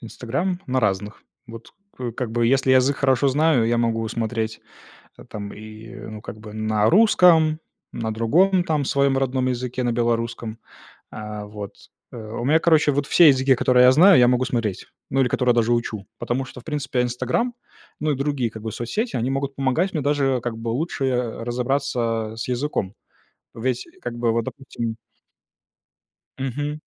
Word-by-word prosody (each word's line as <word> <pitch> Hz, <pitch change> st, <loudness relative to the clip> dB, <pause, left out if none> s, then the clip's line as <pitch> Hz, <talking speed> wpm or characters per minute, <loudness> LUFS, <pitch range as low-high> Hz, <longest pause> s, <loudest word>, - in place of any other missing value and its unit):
"Инстаграм"? 135 Hz, -, -3 dB
На 130 Hz, 0 st, 0 dB
разных. 105 Hz, 0 st, -2 dB, 0.2 s
Вот, 115 Hz, 0 st, -11 dB, 0.2 s
к 125 Hz, -2 st, -4 dB
как 120 Hz, 0 st, -4 dB
бы, 120 Hz, 0 st, +1 dB
если 130 Hz, +1 st, +3 dB
язык 130 Hz, +2 st, +4 dB
хорошо 135 Hz, 0 st, +2 dB
знаю, 140 Hz, -3 st, +3 dB
я 120 Hz, +1 st, +1 dB
могу 115 Hz, -1 st, 0 dB
смотреть 110 Hz, -1 st, -3 dB, 0.7 s
там 100 Hz, -1 st, -7 dB
и, 110 Hz, +2 st, -11 dB
ну, 110 Hz, -3 st, -9 dB
как 110 Hz, -, -9 dB
бы, 105 Hz, -1 st, -11 dB
на 110 Hz, 0 st, +1 dB
русском, 170 Hz, -6 st, +5 dB, 0.3 s
на 110 Hz, -1 st, -3 dB
другом 175 Hz, -, +3 dB
там 155 Hz, -4 st, 0 dB
своём 140 Hz, 0 st, +2 dB
родном 130 Hz, -1 st, 0 dB
языке, 125 Hz, 0 st, -2 dB
на 120 Hz, -, +1 dB
белорусском. 115 Hz, -1 st, -2 dB, 0.5 s
Э, 105 Hz, -1 st, -6 dB
вот 105 Hz, -1 st, -8 dB, 0.4 s
э, -, -, -9 dB
у 110 Hz, +1 st, -6 dB
меня, 155 Hz, +4 st, +4 dB
короче, 160 Hz, -3 st, +4 dB
вот 145 Hz, 0 st, -1 dB
все 175 Hz, -, +6 dB
языки, 135 Hz, -1 st, +4 dB
которые 125 Hz, 0 st, +4 dB
я 125 Hz, -, +8 dB
знаю, 180 Hz, +8 st, +7 dB
я 125 Hz, -, +6 dB
могу 125 Hz, +1 st, +2 dB
смотреть, 115 Hz, -6 st, -2 dB, 0.2 s
ну, 135 Hz, -, +1 dB
или 130 Hz, -, +3 dB
которые 125 Hz, 0 st, +2 dB
даже 120 Hz, 0 st, +2 dB
учу, 110 Hz, -4 st, -3 dB
потому 130 Hz, +2 st, -2 dB
что, 130 Hz, -1 st, -11 dB
в -, -, -27 dB
принципе, 140 Hz, -5 st, -2 dB
"Инстаграм", 125 Hz, -, -1 dB, 0.5 s
ну, 155 Hz, 0 st, 0 dB
и -, -, 0 dB
другие, 140 Hz, -3 st, -1 dB
как 110 Hz, -, -9 dB
бы, 110 Hz, -, -4 dB
соцсети, 210 Hz, -, -3 dB
они 120 Hz, +2 st, -1 dB
могут 135 Hz, 0 st, -2 dB
помогать 140 Hz, +8 st, 0 dB
мне 155 Hz, -, -1 dB
даже, 140 Hz, -2 st, +1 dB
как 120 Hz, -1 st, -4 dB
бы, 115 Hz, +1 st, -4 dB
лучше, 140 Hz, +3 st, -2 dB
э, 125 Hz, -3 st, -2 dB
разобраться 120 Hz, -3 st, -1 dB
с 115 Hz, -, -4 dB
языком. 125 Hz, -6 st, -2 dB, 0.6 s
Ведь, 125 Hz, +1 st, -2 dB
как -, -, -5 dB
бы, 120 Hz, -1 st, +1 dB
вот, 115 Hz, 0 st, -1 dB
допустим 115 Hz, -4 st, -5 dB, 1.4 s
Мгм. 145 Hz, +3 st, -3 dB
125 Hz, 175 wpm, -22 LUFS, 115-140 Hz, 1.4 s, я